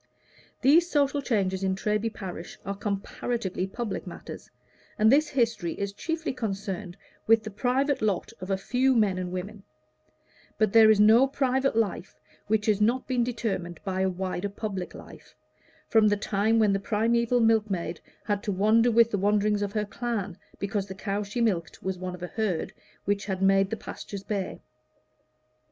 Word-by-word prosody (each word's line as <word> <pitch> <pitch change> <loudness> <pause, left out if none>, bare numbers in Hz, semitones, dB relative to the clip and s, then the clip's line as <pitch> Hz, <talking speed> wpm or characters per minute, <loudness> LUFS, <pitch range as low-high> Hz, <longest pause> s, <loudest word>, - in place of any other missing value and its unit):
These 330 +6 +5
social 285 -2 +1
changes 195 -7 0
in 190 0 +1
Treby 210 +3 -1
parish 180 -5 -8
are 200 - -2
comparatively 200 -1 -3
public 215 0 -5
matters, - - -9 0.5
and 220 +1 +5
this 300 +3 +4
history 230 - 0
is 200 0 -4
chiefly 325 +7 -3
concerned 195 -5 -4 0.3
with 225 0 +5
the 215 - -6
private 260 +6 0
lot 210 -2 -1
of 185 - -6
a 195 - +1
few 255 +6 +1
men 200 -5 +2
and 180 -1 -4
women; 195 +3 -6 1.0
but 215 -2 +2
there 225 -1 +8
is 215 -1 +5
no 225 +5 +6
private 265 -1 0
life 210 -4 -2 0.3
which 215 0 +1
has 210 -2 +2
not 240 +5 +2
been 250 -2 +1
determined 210 -8 -3
by 190 -2 -2
a 190 - +2
wider 185 +1 -3
public 200 -3 -5
life, - - -13 0.5
from 220 -1 +4
the 205 0 +2
time 210 +2 +1
when 215 -3 +4
the 195 - +1
primeval 235 +4 +1
milkmaid 210 -7 +1 0.2
had 205 -1 -1
to 205 - -2
wander 215 +5 +4
with 230 0 +4
the 205 - 0
wanderings 205 +1 +2
of 200 -1 -2
her 210 -1 0
clan, 210 -4 -3 0.2
because 200 0 -2
the 190 - -7
cow 200 +1 -2
she 210 +4 -3
milked 180 -8 -1
was 190 -1 -3
one 180 0 -4
of 180 - -11
a - - -3
herd 200 -5 -2 0.3
which 200 0 0
had 190 -2 -2
made 195 0 +3
the 225 - -3
pastures 200 -1 -8
bare. 200 -2 -4
210 Hz, 175 wpm, -27 LUFS, 195-230 Hz, 1.0 s, there